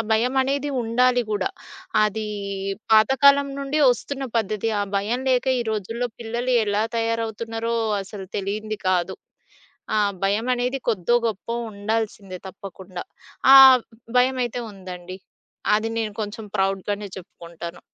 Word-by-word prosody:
భయమనేది 265 +5 +1
ఉండాలి 245 +2 +3
గూడా, 205 -3 0 0.6
అది 215 +1 -2 0.7
పాతకాలం 280 +6 +5
నుండి 280 +2 -1
వస్తున్న 270 +2 -3
పద్ధతి. 215 +1 -1
ఆ - - +1
భయం 230 +6 -1
లేక 255 +1 +2
ఈ - - 0
రోజుల్లో 225 +4 -2
పిల్లలు 235 +3 -2
ఎలా 205 +1 +1
తయారవుతున్నారో 230 0 -2 0.3
అసలు 195 0 -9
తెలియంది 210 +2 -3
కాదు. 185 0 +1 0.8
ఆ - - +3 0.3
భయమనేది 245 +6 0
కొద్దో 220 +1 +2
గొప్పో 220 +2 -4 0.2
ఉండాల్సిందే 205 -2 -3
తప్పకుండా. 190 -2 -9 0.5
ఆహ్, 265 -1 +10 0.4
భయమైతే 250 -1 +1
ఉందండి. 185 -1 -9 0.6
అది 215 +1 0
నేను 215 -2 -2
కొంచెం 215 +1 -5
ప్రౌడ్‌గానే 195 +2 -1
చెప్పుకుంటాను. 170 -2 -9
220 Hz, 110 wpm, -23 LUFS, 195-245 Hz, 0.8 s, ఆహ్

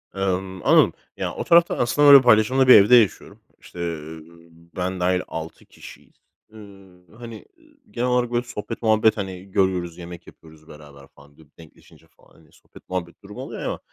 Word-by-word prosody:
Emm, 95 -1 -4
anladım. - - +4 0.2
Yani, - - -4
o - - -5
tarafta 170 0 +3
aslında 145 +4 +1
böyle 140 -1 +9
paylaşımlı 125 +3 +3
bir 130 - +9
evde 105 +5 +6
yaşıyorum. 110 -8 0 0.2
İşte, 90 - -15
ııı, 80 -2 -7 0.5
ben 90 0 -4
dâhil 90 0 0
6 80 0 -9
kişiyiz. - - -16 0.4
Iıı, 95 -4 -17
hani, 115 -2 -11
ııı, 315 -1 -26 0.2
genel 125 -6 -3
olarak 125 -1 -1
böyle 120 0 -1
sohbet 115 -1 -8
muhabbet, 110 -1 +2
hani, 95 -1 -8
görüyoruz, 90 -3 -1
yemek 85 -1 -11
yapıyoruz 80 -1 -18
beraber 70 -3 -16
falan 70 +1 -22
dü 80 - -20
denkleşince 80 -2 -20
falan, - - -26
hani, - - -24
sohbet - - -21
muhabbet 90 +1 -6
durumu 100 +1 -11
oluyor - - -9
ama - - -4
95 Hz, 170 wpm, -21 LUFS, 85-115 Hz, 0.5 s, böyle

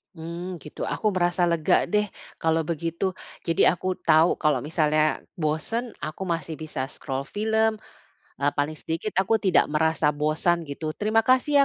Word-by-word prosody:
Mmm, 170 +3 -6
gitu, 150 - -9
aku 215 - -1
merasa 175 0 +2
lega, 165 -2 +3
deh, 210 0 +3 0.3
kalau 160 0 +2
begitu. 170 +3 -1 0.4
Jadi 165 - +2
aku 180 +2 -4 0.2
tahu 160 +2 +6
kalau 150 -2 +2
misalnya 155 0 +2 0.2
bosen, 170 +10 -2
aku 155 +5 -5
masih 165 -3 -3
bisa 150 -4 -3
scroll 135 -1 -5
film, 220 +1 +2 0.7
eee, 140 +1 +2
paling 150 +2 0
sedikit 165 +8 -3
aku 195 +4 +3
tidak 190 - +4
merasa 160 -1 +2
bosan 155 +4 +1
gitu. 155 +2 -4
Terima 215 +4 +2
kasih, 255 +3 +3
165 Hz, 150 wpm, -25 LUFS, 155-190 Hz, 0.7 s, tahu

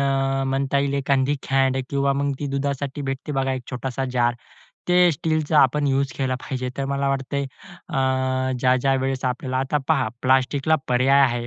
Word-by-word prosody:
अ, 135 -1 +1
म्हणता 135 +1 0
येईल 140 0 0
एखादी 140 0 +1
कॅन 135 -1 +2
किंवा 140 0 +1
मग 140 +1 0
ती 145 - -2
दुधासाठी 140 0 -2
भेटते 135 +2 -4
बघा 135 -1 0
एक 130 -1 -4
छोटासा 130 +1 -3
जार, 120 -1 +2 0.5
ते 180 0 +5
स्टीलचा 155 +1 0
आपण 145 +3 +3
युज 135 0 +1
केला 130 -2 0
पाहिजे. 130 0 -4
तर 140 - -2
मला 140 0 -1
वाटतंय 135 +1 -1 0.5
अ, 130 0 0
ज्या-ज्या 130 +1 +3
वेळेस 135 0 -1
आपल्याला 130 +1 -2
आता 135 +3 0
पहा, 140 -7 +2
प्लास्टिकला 135 +4 +2
पर्याय 130 +3 +4
आहे, 120 -2 +1
135 Hz, 170 wpm, -23 LUFS, 130-140 Hz, 0.5 s, ते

